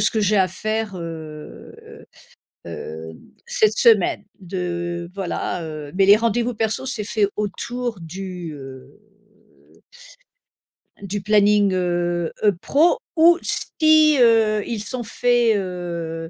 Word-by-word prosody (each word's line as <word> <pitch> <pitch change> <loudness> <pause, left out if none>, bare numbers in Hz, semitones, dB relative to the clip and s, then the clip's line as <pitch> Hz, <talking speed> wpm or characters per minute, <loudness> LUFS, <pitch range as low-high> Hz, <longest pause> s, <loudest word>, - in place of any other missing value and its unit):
ce - - +3
que 220 - -1
j'ai 210 0 +2
à 190 -2 +3
faire 215 +1 -3
heu, 160 -3 -9
heu - - -14 0.6
heu, 80 +1 -7
d - - -15 0.3
cette 475 -3 +2
semaine, 460 -2 +4 0.2
de 175 -2 -4
voilà 185 -2 -3
heu, 155 -2 -7
mais 195 - +4
les 205 - +8
rendez-vous 230 +2 0
perso 220 +3 -2
c'est 235 -5 -3
fait 205 -1 +1
autour 230 +2 -4
du 180 0 -7
heu 135 -2 -11 2.1
du 200 0 -4
planning 205 0 +3
heu, 175 -2 -1
heu 210 - +5
pro 325 - +3 0.2
ou 335 +2 +6
si 310 -1 +3
heu, 225 -3 +4
ils 220 -3 -4
sont 245 +3 -5
faits 240 0 +2
heu, 170 -3 -5
200 Hz, 130 wpm, -21 LUFS, 175-230 Hz, 2.1 s, les